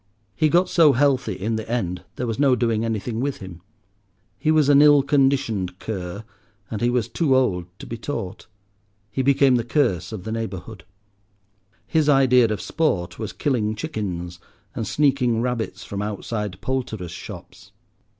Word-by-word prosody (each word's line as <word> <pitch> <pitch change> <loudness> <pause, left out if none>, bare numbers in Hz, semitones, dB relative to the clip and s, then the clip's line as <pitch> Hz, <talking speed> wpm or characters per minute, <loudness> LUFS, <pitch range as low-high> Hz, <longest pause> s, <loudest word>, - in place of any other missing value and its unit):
He 155 -1 +2
got 175 +4 +3
so 160 -5 +5
healthy 135 0 +2
in 110 +4 -2
the 110 0 -6
end, 90 -7 -2
there 125 - -3
was 115 +1 -3
no 140 -3 +4
doing 115 -2 0
anything 115 0 -2
with 140 +2 -1
him. 90 -3 -10 0.8
He 155 - 0
was 155 -2 +4
an 145 0 +6
ill 145 -2 +6
conditioned 135 - +1
cur, 95 -1 -5 0.5
and 110 - -4
he 120 - +3
was 120 -2 0
too 135 +2 +1
old 90 -9 +1
to - - -10
be 115 - -6
taught. 115 -8 -5 0.6
He 130 - -1
became 135 -1 +4
the 120 - -1
curse 120 - 0
of 105 -5 -6
the 110 - -5
neighbourhood. 105 -4 -5 1.0
His 155 -2 +1
idea 130 -3 +5
of 110 -2 -2
sport 125 - -1
was 110 -3 -4
killing 110 -7 -1
chickens 90 -5 -4 0.3
and 110 - -4
sneaking 130 -5 +2
rabbits 120 -2 -2
from 100 0 -5
outside 105 -2 -4
poulterers' 110 -9 -3
shops. - - -10
115 Hz, 160 wpm, -23 LUFS, 105-135 Hz, 1.0 s, an